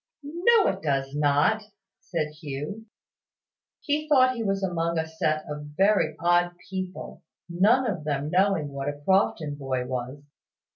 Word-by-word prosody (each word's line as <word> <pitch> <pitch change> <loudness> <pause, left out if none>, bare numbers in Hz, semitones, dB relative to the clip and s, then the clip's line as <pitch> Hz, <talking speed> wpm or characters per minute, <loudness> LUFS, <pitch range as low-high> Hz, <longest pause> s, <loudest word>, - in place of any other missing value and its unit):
"No, 370 +9 +3
it - - -4
does 135 -2 -1
not," 145 +9 +2 0.4
said 160 -4 -3
Hugh. 155 +10 -6 0.9
He 305 +1 -1
thought 255 -3 +5
he 235 - -4
was 195 -2 -1
among 170 -2 -1
a 160 - 0
set 155 -1 -1
of 150 0 -7
very 200 +2 +3
odd 175 +1 +2 0.2
people, 185 -1 -6 0.3
none 205 +10 +3
of 180 -8 -3
them 145 0 -2
knowing 185 -5 +2
what 140 0 -4
a 145 0 -6
Crofton 190 -6 +2
boy 135 -3 -3
was. 130 +3 -5
170 Hz, 145 wpm, -26 LUFS, 145-200 Hz, 0.9 s, thought